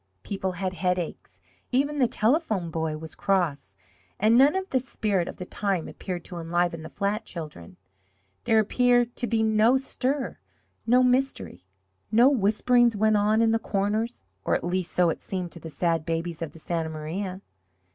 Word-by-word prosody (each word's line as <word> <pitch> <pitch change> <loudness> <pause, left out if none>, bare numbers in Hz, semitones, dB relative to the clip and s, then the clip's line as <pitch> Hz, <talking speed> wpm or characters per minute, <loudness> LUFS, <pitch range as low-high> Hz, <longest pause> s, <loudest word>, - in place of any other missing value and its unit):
People 190 -2 -3
had 185 0 -3
headaches 175 - -3 0.3
even 285 +3 +1
the 250 - +4
Telephone 220 - 0
Boy 160 -1 -2
was 160 +1 -9
cross 150 - -1 0.4
and 215 +3 +4
none 275 +6 +6
of 380 0 -2
the 260 - +3
spirit 210 -7 -1
of - - -7
the 180 - -6
time 195 -3 -2
appeared 180 -2 -6
to 175 -2 -7
enliven 170 0 -1
the 160 - -8
flat 200 +2 -2
children. 150 - -9 0.7
There 225 - +3
appeared 245 +2 +2
to 240 - -1
be 225 -1 +1
no 220 +3 +4
stir 270 +1 -2 0.5
no 250 +2 +5
mystery. 250 - 0 0.4
No 235 +4 +6
whisperings 240 0 +3
went 215 +1 +3
on 215 +2 +3
in 225 - +3
the 225 - +2
corners 215 +3 -1 0.2
or - - +1
at - - -2
least, 180 0 -1
so 175 -2 +3
it - - -6
seemed 180 -3 -4
to 170 - -9
the 165 - -8
sad 165 +1 0
babies 165 0 -3
of 165 - -4
the - - -13
Santa 165 0 -3
Maria. 180 +5 -5
195 Hz, 175 wpm, -26 LUFS, 170-235 Hz, 0.7 s, none